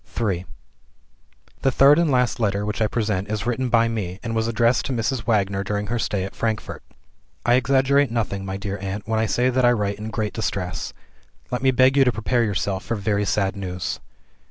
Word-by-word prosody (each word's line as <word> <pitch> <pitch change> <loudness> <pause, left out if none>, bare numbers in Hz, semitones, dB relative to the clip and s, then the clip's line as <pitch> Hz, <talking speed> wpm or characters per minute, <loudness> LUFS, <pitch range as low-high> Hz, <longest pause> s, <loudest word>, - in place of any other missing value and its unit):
III 95 -6 -1 1.1
The 135 - +3
third 140 +4 +6
and 170 -2 +2
last 125 -2 +1
letter 100 -2 0
which 105 +1 -3
I 110 - +3
present 105 -3 -1
is 110 -1 -2
written 125 +1 -1
by 115 -1 +4
me, 100 -5 -4
and 115 -1 -3
was 110 0 +1
addressed 115 +2 +2
to - - -4
Mrs. 115 -1 -2
Wagner 100 -3 +1
during 105 +1 -2
her 120 - 0
stay 100 -4 -1
at 95 - -6
Frankfort: 110 -2 -3 0.6
"I 120 - +4
exaggerate 135 +2 +3
nothing, 110 -4 -2
my 95 0 -4
dear 100 0 -4
aunt, 100 +1 -5
when 110 -1 0
I 110 - +1
say 125 +4 +2
that 130 0 +1
I 120 - +6
write 105 -2 -2
in 110 +1 -5
great 110 -2 -2
distress. 100 -4 -3 0.6
Let 125 - -1
me 135 - +3
beg 130 +1 +4
you 135 - +7
to 125 - +3
prepare 120 +2 0
yourself 100 -2 -1
for 115 - -2
very 105 0 0
sad 100 0 0
news. 90 -2 -4
110 Hz, 205 wpm, -23 LUFS, 100-120 Hz, 1.1 s, you